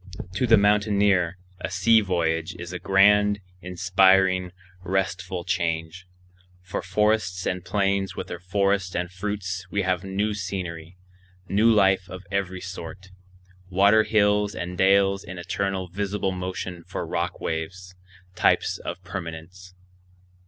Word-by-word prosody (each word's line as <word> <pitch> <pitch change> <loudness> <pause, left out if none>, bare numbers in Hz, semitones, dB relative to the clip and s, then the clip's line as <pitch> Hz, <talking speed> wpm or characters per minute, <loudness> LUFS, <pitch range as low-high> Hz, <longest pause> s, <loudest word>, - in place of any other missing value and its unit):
To 125 +7 0
the 115 -1 +7
mountaineer 100 -3 +2 0.2
a - - -4
sea 105 +5 +4
voyage 85 -4 -1
is 85 0 -7
a 90 - -4
grand, 105 +2 +4 0.2
inspiring, 95 0 +3 0.3
restful 90 -1 -2
change. 85 0 -2 0.6
For 90 - -4
forests 100 -2 0
and 90 -1 -2
plains 100 0 0
with - - -4
their 85 - -7
flowers 100 +1 0
and 90 0 -2
fruits 95 -2 -4
we 100 +1 -1
have 95 0 0
new 100 +2 -1
scenery, 90 -3 -5 0.5
new 105 +4 +3
life 95 -3 +3
of 90 +1 -8
every 95 -2 -2
sort; 95 0 -8 0.6
water 100 +4 +5
hills 105 -1 +2
and 90 0 -5
dales 95 +1 +3
in 95 +1 -8
eternal 95 +1 -2
visible 100 +1 -2
motion 90 -1 -5
for 90 - -5
rock - - -3
waves, 90 +3 -5 0.4
types 90 - +2
of 90 +2 -6
permanence. 90 0 -8
95 Hz, 130 wpm, -25 LUFS, 90-100 Hz, 0.6 s, the